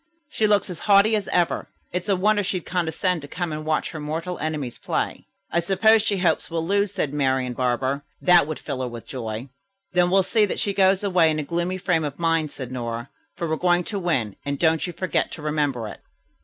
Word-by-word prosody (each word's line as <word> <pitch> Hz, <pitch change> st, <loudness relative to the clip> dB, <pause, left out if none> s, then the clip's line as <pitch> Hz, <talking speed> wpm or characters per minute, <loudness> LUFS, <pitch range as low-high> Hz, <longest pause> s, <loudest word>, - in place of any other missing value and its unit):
She 220 Hz, -7 st, +1 dB
looks 205 Hz, -2 st, +3 dB
as 175 Hz, -, -7 dB
haughty 200 Hz, +2 st, +6 dB
as 210 Hz, -2 st, -2 dB
ever. 175 Hz, -2 st, 0 dB, 0.2 s
It's 180 Hz, +3 st, -2 dB
a 195 Hz, -, +4 dB
wonder 205 Hz, +3 st, +2 dB
she'd 185 Hz, -2 st, -2 dB
condescend 180 Hz, 0 st, 0 dB
to 145 Hz, -, -9 dB
come 175 Hz, +2 st, -3 dB
and 155 Hz, 0 st, -4 dB
watch 155 Hz, 0 st, -1 dB
her 160 Hz, -, -6 dB
mortal 165 Hz, +4 st, -4 dB
enemies 150 Hz, -6 st, -3 dB
play." -, -, -3 dB, 0.2 s
"I 170 Hz, -, +2 dB
suppose 215 Hz, +5 st, +4 dB
she 205 Hz, -2 st, 0 dB
hopes 180 Hz, -2 st, +1 dB
we'll 165 Hz, -1 st, -2 dB
lose," 200 Hz, +2 st, +1 dB
said 165 Hz, -8 st, -2 dB
Marian 130 Hz, -3 st, +1 dB
Barber. 130 Hz, +3 st, 0 dB, 0.2 s
"That 175 Hz, -4 st, +5 dB
would 155 Hz, -, -4 dB
fill 130 Hz, -, -5 dB
her 130 Hz, -, -1 dB
with 120 Hz, -1 st, -8 dB
joy." 115 Hz, 0 st, -5 dB, 0.4 s
"Then 180 Hz, -1 st, +3 dB
we'll 190 Hz, +1 st, +4 dB
see 210 Hz, +3 st, +3 dB
that -, -, -3 dB
she 200 Hz, -, 0 dB
goes 195 Hz, 0 st, +3 dB
away 180 Hz, -5 st, +4 dB
in 155 Hz, -, 0 dB
a 155 Hz, -, -1 dB
gloomy 175 Hz, +4 st, -2 dB
frame 180 Hz, -3 st, +1 dB
of 145 Hz, -2 st, -4 dB
mind," 165 Hz, -2 st, +1 dB
said 130 Hz, -3 st, -7 dB
Nora, 120 Hz, 0 st, -4 dB, 0.3 s
"for 170 Hz, -, -3 dB
we're 160 Hz, 0 st, -1 dB
going 175 Hz, 0 st, +2 dB
to 200 Hz, +3 st, -3 dB
win, 130 Hz, -, -1 dB
and 140 Hz, 0 st, -2 dB
don't 160 Hz, +1 st, +2 dB
you -, -, -4 dB
forget 185 Hz, +1 st, -1 dB
to 155 Hz, -, -8 dB
remember 145 Hz, -6 st, -1 dB
it." -, -, -9 dB
165 Hz, 225 wpm, -24 LUFS, 145-185 Hz, 0.4 s, haughty